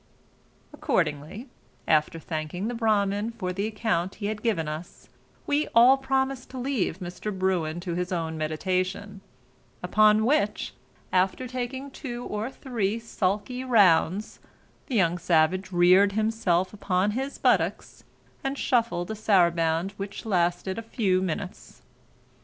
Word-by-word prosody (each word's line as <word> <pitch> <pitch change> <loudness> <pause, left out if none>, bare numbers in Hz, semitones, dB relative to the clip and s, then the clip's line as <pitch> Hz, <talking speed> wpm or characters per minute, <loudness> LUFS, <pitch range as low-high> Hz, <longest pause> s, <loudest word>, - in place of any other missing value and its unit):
Accordingly 155 - -2 0.4
after 155 +1 +2
thanking 160 +5 -4
the 240 - -2
Bramin 215 -1 0
for 185 -4 -3
the 200 +3 -2
account 205 -5 -1
he 205 - -6
had 210 0 -3
given 205 -10 0
us, 155 +3 -8 0.4
we 290 +1 +1
all 245 +3 +8
promised 265 -1 -1
to 260 - -8
leave 250 - -1
Mr. 180 +3 -5
Bruin 185 -4 -1
to 175 -1 -4
his 180 +1 -3
own 165 -2 -2
meditation; 185 +5 -2 0.6
upon 215 0 +4
which, 255 -5 +1 0.4
after 190 +7 +1
taking 255 +2 -5
two 245 -3 -6
or 210 +3 -3
three 230 -6 -2
sulkey 215 +3 -2
rounds, 200 -5 +3 0.5
the 260 - -3
young 180 -4 +2
savage 175 +3 +2
reared 185 +3 +5
himself 215 -4 +1
upon 195 -1 0
his 270 +5 -3
buttocks, - - 0 0.4
and 270 +1 -2
shuffled 230 -10 0
a - - -3
saraband 170 -4 +2
which 200 +3 -6
lasted 180 0 0
a - - -4
few 200 -5 0
minutes. 185 +1 -5
200 Hz, 130 wpm, -26 LUFS, 175-230 Hz, 0.6 s, all